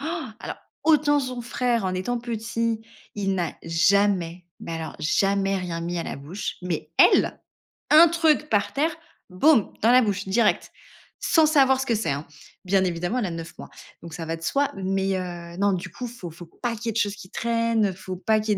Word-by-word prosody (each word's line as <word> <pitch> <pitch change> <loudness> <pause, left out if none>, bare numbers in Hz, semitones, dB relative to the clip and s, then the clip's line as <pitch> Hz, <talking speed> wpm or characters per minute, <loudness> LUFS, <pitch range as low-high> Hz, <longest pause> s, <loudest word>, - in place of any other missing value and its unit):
Alors 310 -7 -5 0.3
autant 295 -2 +4
son 255 -3 -3
frère 240 -2 -1
en 185 - -1
étant 210 +7 -2
petit, 230 -1 -2 0.3
il 195 -2 -1
n'a 175 -3 -2
jamais, 180 +1 +2 0.2
mais - - -6
alors 160 -1 -5
jamais 195 +4 +1
rien 175 -3 -4
mis 175 +1 -3
à - - -1
la - - -5
bouche, 155 +9 -5
mais 170 -4 -4
elle, - - +5 0.5
un 320 +3 +9
truc 320 -2 +2
par 205 -2 +1
terre, 300 +4 +2 0.4
boum, 225 +5 +3
dans 230 - +6
la 255 +1 +7
bouche, 200 -4 -1
direct, 210 +3 +1 0.5
sans 320 -1 +4
savoir 270 -4 +4
ce 265 - -1
que 235 - +1
c'est, 220 0 -1
hein. 140 +2 -2 0.4
Bien 190 +1 +3
évidemment, 180 +6 -1
elle 215 - -1
a - - -4
9 165 0 -7
mois, - - -9 0.3
donc 165 -1 -9
ça 165 - -5
va 165 +1 -3
de - - -17
soi, 280 - 0
mais 195 0 -1
heu, 175 -1 -6
non, 200 0 +3
du 185 0 -4
coup, 245 +9 -6
faut 230 -8 -8
faut 170 +1 -12
pas 235 +7 -4
qu'il 235 +2 -7
y - - +2
ait - - -2
de - - -3
choses 205 -2 0
qui 185 -2 -12
traînent. 230 -3 0
Faut 185 0 -7
pas 215 +4 +2
qu'il 210 -1 0
200 Hz, 205 wpm, -24 LUFS, 180-240 Hz, 0.5 s, un